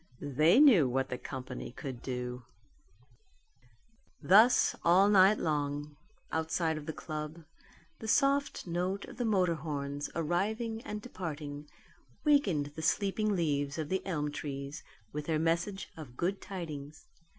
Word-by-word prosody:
They 160 - +6
knew 220 - +7
what 135 +1 0
the 125 - -3
company 130 -2 -6
could 130 -1 -7
do. 125 -1 -4 1.8
Thus 220 +6 +5
all 180 +4 +6
night 200 +1 +6
long, 145 -1 -2 0.4
outside 160 0 0
of 155 -1 -7
the - - -1
club, 155 +1 -6 0.5
the 220 - -7
soft 280 +4 +2
note 180 +3 -2
of - - -12
the 245 - -1
motor 185 -6 +2
horns 145 -2 -4
arriving 215 +8 -1
and 210 0 -5
departing 150 -9 -6 0.5
wakened 195 - +2
the 160 - -6
sleeping 205 +5 +1
leaves 145 -4 0
of 155 -2 -3
the 190 0 -1
elm 150 -5 -2
trees 140 +1 -6 0.3
with 150 0 -4
their 160 -2 +1
message 170 +5 -1
of 135 -6 -10
good 190 +3 -1
tidings. 155 -6 -7
160 Hz, 135 wpm, -31 LUFS, 145-195 Hz, 1.8 s, knew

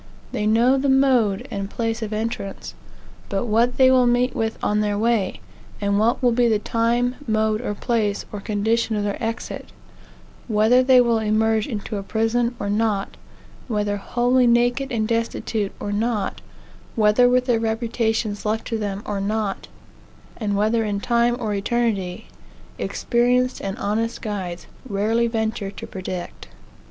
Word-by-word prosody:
They 210 -5 -1
know 240 +5 +4
the 275 +1 0
mode 255 -7 +3
and 195 -1 -3
place 225 +1 -2
of 220 -1 -4
entrance; 215 -2 -4 0.6
but 195 +3 -1
what 235 +2 +2
they 260 -1 +6
will 255 -1 +5
meet 245 +1 +2
with 225 0 -1
on 210 0 +1
their 205 -1 0
way, 220 -3 0 0.4
and 200 0 +1
what 235 +4 +1
will 245 - +5
be 240 +1 +3
the 220 -2 +3
time, 235 +3 0
mode, 215 0 +1 0.2
place, 215 -4 0
or 205 - -5
condition 220 +2 0
of 205 - -1
their 205 +1 -3
exit; 225 +1 -4 0.8
whether 220 +3 +4
they 255 0 +6
will 235 -2 +2
emerge 220 0 +1
into 215 -3 -4
a - - -3
prison, 230 +4 0
or 200 - -3
not; 205 -1 0 0.5
whether 210 -3 -1
wholly 245 +4 +2
naked 245 +3 +2
and 220 -3 0
destitute, 230 -2 -1
or 205 - -4
not; 210 -1 -1 0.5
whether 220 +3 +4
with 250 0 +2
their 240 -3 +2
reputations 225 -1 -1
left 220 +1 -1
to 225 -2 -1
them, 205 -1 -3
or 200 -1 -3
not; 210 0 -2 0.7
and 205 -3 -2
whether 220 +2 +2
in 205 -2 -2
time 235 +2 +2
or 215 -3 -2
eternity; 205 -2 -1 0.5
experienced 250 +1 +1
and 195 +2 -4
honest 225 -1 -1
guides 185 -5 -5 0.2
rarely 220 +4 +1
venture 220 -3 -2
to - - -8
predict. 185 -1 -6
225 Hz, 155 wpm, -22 LUFS, 205-240 Hz, 0.8 s, they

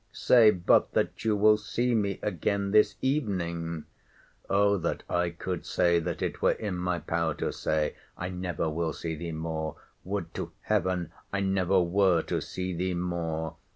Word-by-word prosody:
Say 115 -3 +6
but 90 -4 +3
that - - 0
you 110 -1 +2
will 105 +1 +5
see 120 +4 -1
me 100 -3 +1
again 100 +4 -1
this 105 -1 +4
evening! 85 - -1 0.6
O 100 +1 +4
that 85 - -2
I 90 0 +1
could 85 +1 -4
say—that 85 -2 +1
it - - -3
were - - +4
in 105 -4 -4
my 90 0 -1
power 80 -1 -1
to - - -2
say—I 80 +3 -3
never 90 -3 -2
will 80 0 -1
see 80 +1 -4
thee 85 +2 -5
more!—Would 80 -1 -5
to - - -5
Heaven 90 -3 0 0.2
I 100 - -1
never 95 -1 +2
were 90 -1 +3
to - - -2
see 90 0 -4
thee 90 +1 -1
more! 80 -2 -3
90 Hz, 155 wpm, -28 LUFS, 85-100 Hz, 0.6 s, Say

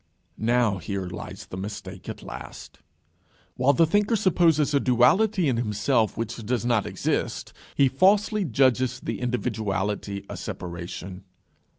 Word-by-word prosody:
Now, 115 -3 +2
here 95 +2 -4
lies 90 +1 -7
the 95 - -7
mistake 95 -1 -7
at - - -7
last. - - -9 0.8
While 130 +3 +3
the 165 - +4
thinker 205 +7 +2
supposes 170 -7 +3
a 140 - +4
duality 155 - +3
in 125 -4 +1
himself 110 +1 +1
which 115 -1 -3
does 120 +2 -1
not 120 -4 +1
exist, - - -2 0.2
he 140 - +5
falsely 200 - +3
judges 130 -3 +2
the - - -5
individuality 105 -5 -2
a - - -7
separation. 90 +2 -7
120 Hz, 130 wpm, -25 LUFS, 100-140 Hz, 0.8 s, he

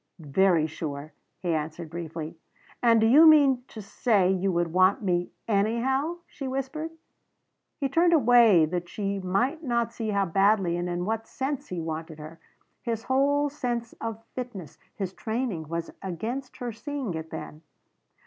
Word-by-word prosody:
"Very 165 +1 +2
sure," 150 -1 -6 0.3
he 175 -2 0
answered 155 +1 -4
briefly. 165 -1 -6 0.5
"And 230 -2 +5
do 220 - +3
you 295 +8 +8
mean 280 -5 +6
to 215 - -9
say 200 -2 +2
you 190 0 +1
would 170 -2 0
want 185 +3 +4
me 175 -2 0 0.2
anyhow?" 235 +10 +1
she 275 - -7
whispered. 270 +4 -3 0.9
He 280 - +1
turned 335 +6 +3
away 235 - +6
that 175 +2 -4
she 200 0 -2
might 240 - 0
not 235 -3 0
see 225 -2 -3
how 200 -1 +1
badly 195 0 +2
and 175 +1 -2
in 175 0 -2
what 225 +2 -2
sense 270 +1 -3
he 180 - -4
wanted 160 -1 -5
her. 155 +2 -10 0.4
His 230 -2 -3
whole 285 +2 +2
sense 240 -5 -3
of 225 -1 -5
fitness 215 - -7 0.2
his 190 -2 -4
training 220 - -3
was 165 +1 -4
against 225 +9 -5
her 245 -1 -4
seeing 260 - -4
it 160 0 -6
then. 155 - -8
205 Hz, 160 wpm, -27 LUFS, 175-250 Hz, 0.9 s, you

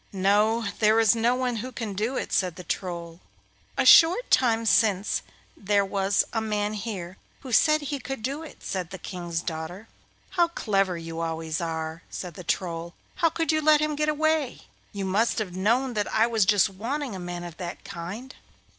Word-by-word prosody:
'No, 210 +4 +2
there 220 +1 +4
is 225 0 +5
no 235 +2 +2
one 250 -2 -1
who 255 +4 -5
can 225 -4 -5
do 220 +7 -1
it,' - - -4
said 180 -3 +1
the 180 - -9
Troll. 170 -1 -4 0.6
'A - - +2
short 350 +9 +7
time 230 -3 +3
since 210 -3 +2 0.3
there 200 0 +1
was 195 0 +1
a 225 - 0
man 210 -1 -1
here 195 -4 -5 0.2
who 265 - -8
said 305 +6 +4
he 285 -1 -3
could 270 -4 -6
do 275 +5 -2
it,' 320 - -12
said 185 -3 -3
the 190 - -7
King's 175 -2 -4
daughter. 170 +5 -5 0.4
'How 350 -3 +3
clever 195 - 0
you 165 0 -6
always 165 +1 -3
are!' 160 0 -4
said 180 -2 -6
the 180 - -9
Troll. 170 -1 -3 0.2
'How 335 -2 +3
could 330 +1 0
you 310 0 +1
let 305 0 +5
him 305 0 0
go 300 +1 +1
away? 305 -2 0 0.3
You 200 -2 -4
must 205 +5 +1
have 195 -5 -3
known 235 +7 +1
that 210 -2 -1
I 220 - +4
was 225 -4 +2
just 205 -1 +4
wanting 235 +5 -4
a - - -6
man 175 0 -5
of 170 -2 -9
that 175 -2 -6
kind. 200 +10 -7
210 Hz, 190 wpm, -26 LUFS, 180-250 Hz, 0.6 s, short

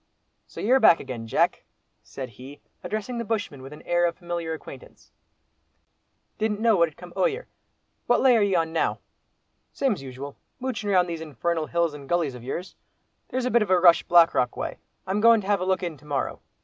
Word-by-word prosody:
"So - - -11
you're 255 +5 +4
back 170 - +6
again, 115 -3 -7
Jack," - - +1 0.4
said 130 -2 -8
he, 130 +6 -12 0.2
addressing 215 +3 -4
the - - -2
bushman 205 - -3
with 135 +1 -10
an 150 - -12
air 175 0 +2
of 170 - -3
familiar 170 -2 -4
acquaintance; 150 -4 -10 1.3
"didn't 215 -1 0
know 225 -1 +4
what 170 -3 +3
had 150 - -24
come 175 0 -12
o'yer. - - 0 0.6
What 245 - +4
lay 260 -2 +5
are 225 - +3
ye 200 -2 +2
on 165 -1 0
now?" 165 - 0 0.8
"Same's 250 - 0
usual, 135 +1 -8 0.2
moochin' 250 -5 -3
round 180 -2 +3
these 165 -2 -5
infernal 160 +2 -2
hills 170 -2 0
and 140 -2 -11
gullies 165 -7 0
ov 125 - -10
yours. 170 +8 -5 0.5
There's 255 -1 -2
a 250 - 0
bit 235 - +4
of 210 - -1
a 185 -1 +4
rush 170 -1 +6
Black 170 -1 +5
Rock 125 -1 0
way. - - -4 0.3
I'm 195 +3 -1
goin' 230 0 +6
to - - -10
have 200 -2 +1
a - - -1
look 190 0 0
in 170 -4 -4
to 145 - -20
morrow. 145 -2 -3
175 Hz, 205 wpm, -25 LUFS, 150-210 Hz, 1.3 s, back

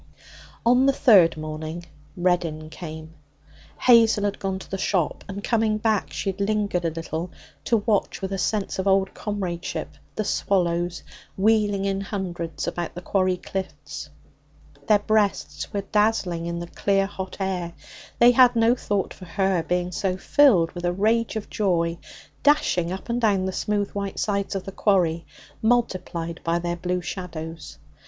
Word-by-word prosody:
On 250 +3 +5
the 275 - +4
third 190 - +5
morning 155 +2 -5 0.3
Reddin 170 -3 0
came. 160 -1 -8 0.7
Hazel 230 -4 +6
had 205 -1 -1
gone 190 -1 -2
to 190 - -12
the 195 - -3
shop, 180 -6 0
and, 200 +1 -6
coming 220 -2 +1
back, 215 -2 0
she 195 - -2
had 195 +1 -8
lingered 200 -4 0
a - - +2
little 165 +1 -4 0.4
to 230 - +3
watch 215 -4 +1
with 195 0 -4
a 195 - -2
sense 200 +1 -1
of 190 - -1
old 195 0 +3
comradeship 190 -5 -4 0.3
the 215 - -1
swallows 175 -3 0 0.3
wheeling 205 -1 +2
in 195 0 -1
hundreds 175 -5 -4
about 175 -1 -3
the 175 - -6
quarry 185 -1 +1
cliffs. 190 +1 -6 0.8
Their 215 - +6
breasts 205 -8 0
were 200 -2 -1
dazzling 195 -5 +1
in 170 0 -3
the 170 - -4
clear 195 +2 +1
hot 190 -1 -6
air. 180 -3 -2 0.4
They 240 +1 +7
had 245 0 +6
no 230 +1 +4
thought 205 -5 -2
for 185 - -12
her, 190 +1 +1
being 180 +2 -1
so 185 0 -1
filled 190 - +4
with 175 - -7
a 175 - +2
rage 220 +5 +1
of 220 - -4
joy, 170 -5 0 0.4
dashing 180 - +3
up 190 - -6
and 240 +1 -1
down 200 -4 +2
the 190 - -1
smooth 205 +1 -1
white 200 -1 -4
sides 200 -1 -1
of 190 - -2
the 195 - -7
quarry, 175 -5 +1 0.3
multiplied 185 -8 0
by 170 0 +1
their 175 0 -2
blue 180 +1 -2
shadows. 165 -3 -6
190 Hz, 160 wpm, -24 LUFS, 175-210 Hz, 0.8 s, They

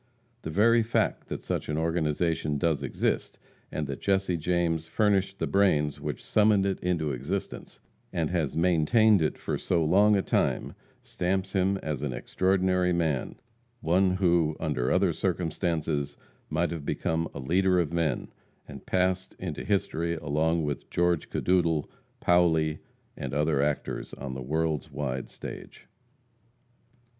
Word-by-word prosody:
The - - -5
very 115 +7 +4
fact 115 +1 0
that - - -5
such - - -3
an 75 - -1
organization 80 -1 0
does 75 -1 +1
exist, 70 - -2 0.3
and 75 - -2
that 70 -2 -6
Jesse 95 -2 +1
James 85 -1 0
furnished 100 0 +1
the - - -1
brains 75 -7 +2
which - - -5
summoned 105 -2 +3
it 95 -1 -1
into 85 -4 -1
existence, 70 +10 -5 0.3
and 80 -2 -1
has 80 -5 -1
maintained 90 +5 +4
it 75 - 0
for - - -3
so 85 -3 +1
long 100 +6 +5
a 100 - +1
time, - - 0 0.3
stamps 95 +1 -2
him 95 0 +1
as 75 -2 -3
an 70 -4 -2
extraordinary 95 +5 +1
man 80 -6 0 0.5
one 90 0 +2
who, 85 -4 +2
under 65 -6 -1
other - - +3
circumstances, 80 -4 -1 0.3
might 85 +3 0
have 85 -3 -5
become 80 +3 -1
a - - -5
leader 90 +7 +2
of 85 -1 -1
men, 80 -6 -1 0.4
and - - -11
passed 95 0 0
into 85 -5 -5
history 85 -4 0
along 80 +2 0
with 75 -2 -4
George 85 -2 +1
Cadoudal, 85 -4 +1 0.3
Paoli, 80 -3 +3 0.4
and 70 0 -5
other 75 0 +2
like 70 - +3
actors 75 - -4
on 65 - -6
the 65 - -6
world's 75 +2 -1
wide 65 -3 -3
stage. - - -9
85 Hz, 145 wpm, -28 LUFS, 75-95 Hz, 0.5 s, long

